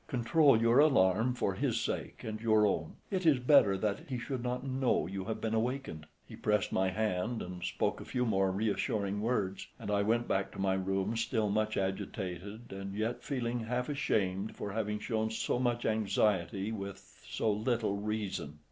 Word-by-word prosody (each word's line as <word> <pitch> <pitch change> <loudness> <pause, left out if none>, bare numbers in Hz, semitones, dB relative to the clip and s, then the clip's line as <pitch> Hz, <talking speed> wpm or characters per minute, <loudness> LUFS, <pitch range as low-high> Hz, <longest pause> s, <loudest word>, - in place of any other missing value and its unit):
Control 130 +1 +4
your 115 +3 +4
alarm 115 -4 +4
for 100 - 0
his 95 - 0
sake - - -4
and 110 -1 -5
your 110 -2 +4
own. 80 -6 -1 0.2
It 190 -2 0
is 155 -5 +5
better 125 -6 +5
that 100 +6 -2
he 130 - -2
should 125 +1 -4
not 125 +1 -2
know 130 - +1
you 95 +2 -5
have 110 - -3
been 110 0 -2
awakened." 110 - -2 0.2
He - - -10
pressed 105 0 +1
my 95 0 +2
hand 110 +3 -1
and 90 0 -7
spoke 90 - -1
a - - -8
few 125 -1 -1
more 95 -4 +2
reassuring 100 0 -1
words, 105 -5 -1
and - - -5
I 100 0 +2
went 115 +3 +1
back 95 0 0
to - - -9
my 95 -1 +2
room 95 +3 -1
still 110 -2 0
much 110 +1 0
agitated, 95 +2 -4
and 95 0 -6
yet 110 +3 -2
feeling 120 -3 -2
half 125 +3 -2
ashamed 105 -9 0
for 100 - -5
having 105 0 -1
shown 110 0 -1
so 110 +2 -1
much 120 -1 0
anxiety 100 -2 +1
with 100 -3 -8
so 110 - 0
little 110 0 0
reason. 100 -8 -3
110 Hz, 185 wpm, -32 LUFS, 95-120 Hz, 0.2 s, is